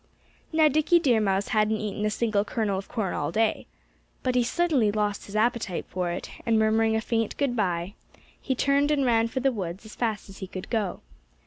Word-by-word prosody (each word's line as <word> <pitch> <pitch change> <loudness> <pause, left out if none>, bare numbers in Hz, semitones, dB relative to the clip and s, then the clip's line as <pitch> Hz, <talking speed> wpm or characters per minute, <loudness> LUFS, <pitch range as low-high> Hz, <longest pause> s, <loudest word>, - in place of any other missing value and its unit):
Now, 315 -1 +5
Dickie 310 +4 +3
Deer 250 -9 +3
Mouse 195 -1 0
hadn't 215 0 +2
eaten 210 0 -4
a - - +1
single 210 -2 +1
kernel 210 -2 -1
of 195 - -9
corn 215 -6 -2
all 145 +1 -2
that - - 0
day. - - -15 0.6
But 255 - +1
he 250 -1 +3
suddenly 270 -5 +2
lost 210 -1 -1
his 200 - -9
appetite 220 -4 0
for 180 -1 -2
it; 175 - -5
and 230 -1 +2
murmuring 220 +1 +3
a 220 - +1
faint 225 -1 -1
good 275 -4 0
bye 180 -3 -1 0.5
he 265 - -1
turned 280 +3 +2
and 285 -3 +2
ran 230 -2 +3
for 260 +3 -3
the 270 +1 +3
woods 190 -3 -5
as 215 - -11
fast 220 -4 -2
as 195 -1 -12
he 190 - -5
could 185 0 -8
go. 210 -6 -1
220 Hz, 215 wpm, -26 LUFS, 200-245 Hz, 0.6 s, Now